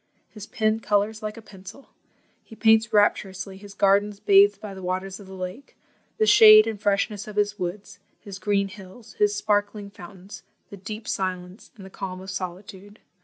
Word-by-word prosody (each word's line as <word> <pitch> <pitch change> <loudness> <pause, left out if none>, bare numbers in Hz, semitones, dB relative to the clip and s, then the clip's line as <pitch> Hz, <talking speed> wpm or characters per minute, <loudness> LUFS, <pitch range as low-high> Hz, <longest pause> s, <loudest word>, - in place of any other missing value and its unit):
His 210 -1 -10
pen 220 -1 0
colours 210 0 -1
like 215 +1 -6
a 225 - -11
pencil. 195 +7 -14 0.5
He 220 - -14
paints 220 0 +3
rapturously 195 -2 0
his 200 0 -13
gardens 200 +1 +2
bathed 400 - +4
by 210 -2 -8
the 190 - -10
waters 185 +2 -4
of 200 - -13
the 190 - -10
lake, 185 +9 -8 0.4
the 215 - +2
shade 215 0 +8
and 220 -2 -5
freshness 205 +1 -1
of 210 - -9
his 210 0 -1
woods, 185 +3 -6 0.2
his 195 -1 -10
green 200 0 0
hills, 195 +3 -14
his 210 0 +2
sparkling 205 -1 -1
fountains, 190 0 -12 0.3
the 200 - -9
deep 210 +3 -8
silence, 185 +1 -5
and 195 - -12
the 190 - -13
calm 185 -1 -7
of 190 +1 -8
solitude. 195 +2 -8
205 Hz, 175 wpm, -24 LUFS, 190-215 Hz, 0.5 s, shade